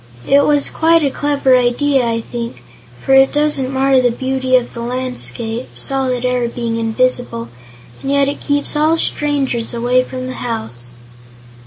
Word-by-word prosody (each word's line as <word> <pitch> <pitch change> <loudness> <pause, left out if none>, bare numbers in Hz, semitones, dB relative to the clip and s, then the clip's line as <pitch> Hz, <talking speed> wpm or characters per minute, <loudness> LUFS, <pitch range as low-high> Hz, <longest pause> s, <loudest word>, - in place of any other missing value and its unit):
It 280 +1 +5
was 290 -1 +1
quite 330 0 +3
a 280 - +1
clever 280 -2 +2
idea, 255 +2 +2
I 230 0 -1
think, 235 +1 -7 0.4
for 270 - +3
it 270 0 +6
doesn't 295 -3 +1
mar 265 0 +3
the 245 - +3
beauty 260 +1 -1
of 250 -1 +1
the 235 - -6
landscape, 245 -1 -3
solid 260 -2 -2
air 250 -1 0
being 235 -1 -3
invisible, 225 - -1 0.5
and 270 - -4
yet 280 0 +3
it 285 - -4
keeps 285 0 0
all 310 +2 +3
strangers 275 -7 0
away 245 +2 +2
from 255 0 -6
the 255 - -5
house." 120 - -3
255 Hz, 160 wpm, -16 LUFS, 240-275 Hz, 0.5 s, it